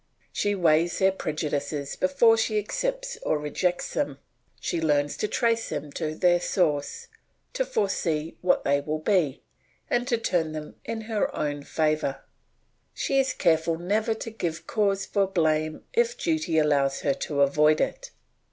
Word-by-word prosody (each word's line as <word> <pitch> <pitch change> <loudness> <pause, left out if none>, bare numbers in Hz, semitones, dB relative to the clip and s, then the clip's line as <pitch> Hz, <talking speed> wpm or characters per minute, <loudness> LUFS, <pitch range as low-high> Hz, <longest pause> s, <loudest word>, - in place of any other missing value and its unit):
She 205 0 0
weighs 170 -1 +3
their 190 0 +4
prejudices 150 -4 -3
before 205 +5 +4
she 220 -1 0
accepts - - -2
or 155 - +1
rejects 175 +4 -1
them; 140 -2 -1 0.4
she 170 - -2
learns 145 -2 +1
to 210 - -1
trace 230 0 0
them 145 0 -4
to 155 +2 -3
their 175 +1 +3
source, 150 -6 -1 0.5
to - - +1
foresee 170 - -1
what 180 - +2
they 140 +1 +2
will 155 +2 -2
be, 155 -4 +1 0.5
and 245 0 +1
to 235 - +2
turn 175 -8 0
them 155 -1 -6
in 225 -1 -4
her 220 -1 -1
own 145 -1 -2
favour; 155 -2 -1 0.7
she 275 - +1
is 265 -1 +2
careful 165 -3 +2
never 215 +6 0
to 225 - -6
give 170 -7 -4
cause 200 -2 0
for 200 -2 +1
blame 155 -4 0
if 475 +1 +2
duty 315 - 0
allows 140 -3 +2
her 140 - +2
to 140 +1 -2
avoid 150 +2 +4
it. - - -2
170 Hz, 155 wpm, -26 LUFS, 150-215 Hz, 0.7 s, their